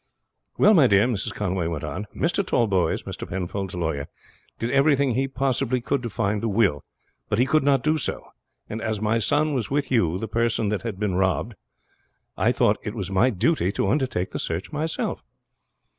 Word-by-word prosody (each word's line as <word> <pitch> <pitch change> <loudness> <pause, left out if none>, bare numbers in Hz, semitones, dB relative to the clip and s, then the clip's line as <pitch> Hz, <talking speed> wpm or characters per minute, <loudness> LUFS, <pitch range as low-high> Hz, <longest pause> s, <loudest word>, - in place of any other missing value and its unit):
"Well, 215 - +6
my 155 -9 +6
dear," 100 0 +4
Mrs. 120 -5 -2
Conway 95 -4 -2
went 85 -3 -4
on, 75 +8 -5
"Mr. 175 +4 +1
Tallboys, 100 - +1
Mr. - - -7
Penfold's 95 +1 -4
lawyer, 80 -4 -2 0.5
did 115 +1 -2
everything 140 -2 +3
he 135 +3 0
possibly 130 -1 0
could 130 +2 -1
to 120 - -4
find 105 -2 -1
the 115 - -1
will, 100 - +2 0.5
but 105 - +1
he 125 - +4
could 155 +3 +3
not 135 -2 +3
do 155 +1 +2
so; - - -3 0.4
and 110 +1 -5
as 110 -2 -2
my 110 +2 +1
son 145 +6 +1
was 125 -6 -1
with 140 -1 -1
you 90 -9 +2
the 115 - -4
person 115 -1 0
that 105 -1 -1
had 110 -5 -5
been 105 -3 0
robbed, 95 +5 0 0.8
I - - +2
thought - - +2
it 105 - -5
was 100 -3 -4
my 95 +7 +4
duty 110 - +1
to 100 - 0
undertake 130 -9 0
the - - -4
search 85 - -3
myself." 155 +2 -2
115 Hz, 190 wpm, -24 LUFS, 95-135 Hz, 0.8 s, Well